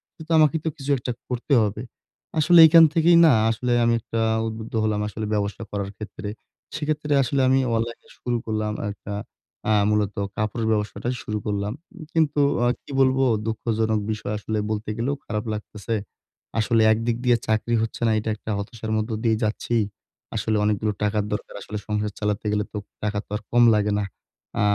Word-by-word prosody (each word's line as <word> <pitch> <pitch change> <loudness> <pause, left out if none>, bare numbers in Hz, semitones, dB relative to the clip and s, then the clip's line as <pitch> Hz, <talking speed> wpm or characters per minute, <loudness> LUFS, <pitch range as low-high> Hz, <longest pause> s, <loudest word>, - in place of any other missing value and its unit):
কিন্তু 160 +1 -10
আমাকে 155 +1 +4
তো - - +2
কিছু 140 0 -7
একটা 125 0 -4 0.2
করতে 125 +3 -1
হবে। 105 +1 -2 0.6
আসলে 170 +2 +6
এখান 165 +1 +8
থেকেই 170 0 +5
না 155 - +7 0.2
আসলে 120 +2 -2
আমি 115 0 +3
একটা 115 +1 -4 0.3
উদ্বুদ্ধ 110 0 -6
হলাম 105 -1 0
আসলে 110 +1 -4
ব্যবসা 105 +1 -2
করার 100 -1 -3
ক্ষেত্রে। 105 -1 -7 0.5
সেক্ষেত্রে 150 -1 -1
আসলে 135 +2 0
আমি 130 +1 +4 0.2
অনলাইনে 115 +1 -3
শুরু 120 -1 -1
করলাম 110 -1 -1 0.2
একটা 100 0 -8 0.6
আ 110 - +4 0.2
মূলত 105 -1 +1 0.2
কাপড়ের 110 +1 -1
ব্যবসাটা 105 +3 -1
শুরু 105 0 -3
করলাম। 105 +1 -1 0.4
কিন্তু 155 -3 +2 0.3
আ - - +4 0.2
কি - - -12
বলবো 135 0 +3 0.2
দুঃখজনক 110 -1 0
বিষয়? 105 0 -3
আসলে 110 +1 -3
বলতে 105 0 -3
গেলেও 130 +5 0
খারাপ 105 0 -3
লাগতেছে। 105 +1 -4 0.6
আসলে 115 +1 +3
একদিক 115 +1 -1
দিয়ে 120 -1 +5
চাকরি 110 +2 +1
হচ্ছে 115 - -4
না, - - +3
এটা 110 +1 -3
একটা 110 0 -6
হতাশার 110 +2 -5
মধ্য 110 +2 -2
দিয়েই 110 -1 +2
যাচ্ছি। 110 +2 -1 0.6
আসলে 110 0 0
অনেকগুলো 105 0 +1
টাকার 105 0 +1
দরকার। 105 - -5
আসলে 105 +2 -6
সংসার 105 -1 -1
চালাতে 105 0 -1
গেলে 105 0 +1
তো - - -3 0.3
টাকা 105 -1 -1
তো - - -54
আর 105 - -3
কম 120 0 +5
লাগে 105 0 +1
না? - - 0 0.6
আ - - +2
110 Hz, 175 wpm, -24 LUFS, 105-120 Hz, 0.6 s, এখান